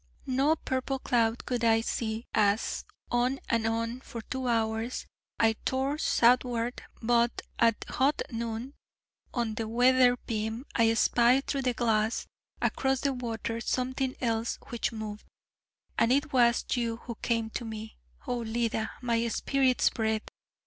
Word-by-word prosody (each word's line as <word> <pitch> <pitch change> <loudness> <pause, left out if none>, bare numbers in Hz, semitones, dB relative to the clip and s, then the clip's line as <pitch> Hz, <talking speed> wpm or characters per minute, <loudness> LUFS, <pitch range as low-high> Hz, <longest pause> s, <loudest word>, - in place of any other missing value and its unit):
No 275 +4 +2
purple 260 -2 -2
cloud 235 -3 +1
could 245 -2 -2
I 225 -1 +4
see 225 0 -3
as, 210 0 +1 0.3
on 250 +3 +1
and 230 -1 +1
on, 230 +2 -1
for 230 -4 -8
two 260 +2 -4
hours, 225 +1 0 0.3
I 225 -1 +4
tore 270 +3 0
southward: 245 -2 +2 0.2
but 235 +1 +2 0.2
at 230 -2 +3
hot 280 +3 +1
noon, 230 +3 -4 0.6
on 235 -3 -1
the 225 0 -3
weather 245 +2 +5
beam 220 +2 -3
I 225 -1 +4
spied 245 +4 +4
through 275 - -1
the 250 -2 0
glass 225 -1 +1 0.4
across 265 -1 +1
the 280 -1 +1
water 230 -2 -3
something 260 +2 -1
else 230 -1 0
which 235 0 -1
moved, 215 -2 -6 0.8
and 230 - +4
it 285 +2 +1
was 240 -2 +4
you 235 -2 0
who 235 - -4
came 230 -2 0
to - - -4
me, 220 -1 -7 0.3
Oh 245 -1 -1
Leda, 225 -1 -1
my 235 -1 +1
spirit's 260 +2 +2
breath! 220 -1 -1
235 Hz, 140 wpm, -29 LUFS, 225-255 Hz, 0.8 s, weather